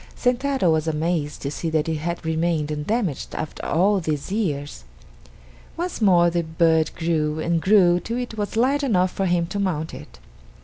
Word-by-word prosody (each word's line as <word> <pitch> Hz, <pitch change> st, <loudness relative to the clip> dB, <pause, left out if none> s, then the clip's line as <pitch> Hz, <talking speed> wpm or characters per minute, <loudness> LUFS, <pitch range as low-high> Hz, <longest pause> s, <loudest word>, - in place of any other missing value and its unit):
Sentaro 250 Hz, -6 st, +1 dB
was 160 Hz, 0 st, 0 dB
amazed 160 Hz, -1 st, -1 dB
to 140 Hz, -, -2 dB
see 165 Hz, +2 st, -3 dB
that 160 Hz, -1 st, 0 dB
it 160 Hz, -1 st, -1 dB
had 170 Hz, +2 st, -4 dB
remained 160 Hz, -1 st, 0 dB
undamaged 155 Hz, -, -2 dB
after 155 Hz, -, -5 dB
all 195 Hz, +6 st, +2 dB
these 155 Hz, -1 st, -3 dB
years. 145 Hz, -, -2 dB, 0.9 s
Once 350 Hz, -6 st, -4 dB
more 175 Hz, -4 st, +5 dB
the 170 Hz, 0 st, +1 dB
bird 160 Hz, -1 st, +2 dB
grew 160 Hz, -2 st, 0 dB
and 165 Hz, +1 st, 0 dB
grew 180 Hz, -3 st, +5 dB
till 230 Hz, +7 st, -4 dB
it 245 Hz, -2 st, -4 dB
was 210 Hz, 0 st, -3 dB
large 275 Hz, +5 st, +2 dB
enough 185 Hz, -8 st, +2 dB
for 195 Hz, -, -1 dB
him 175 Hz, -1 st, +1 dB
to 180 Hz, +4 st, -4 dB
mount 165 Hz, -5 st, -2 dB
it. 75 Hz, -, -11 dB
170 Hz, 175 wpm, -23 LUFS, 155-200 Hz, 0.9 s, more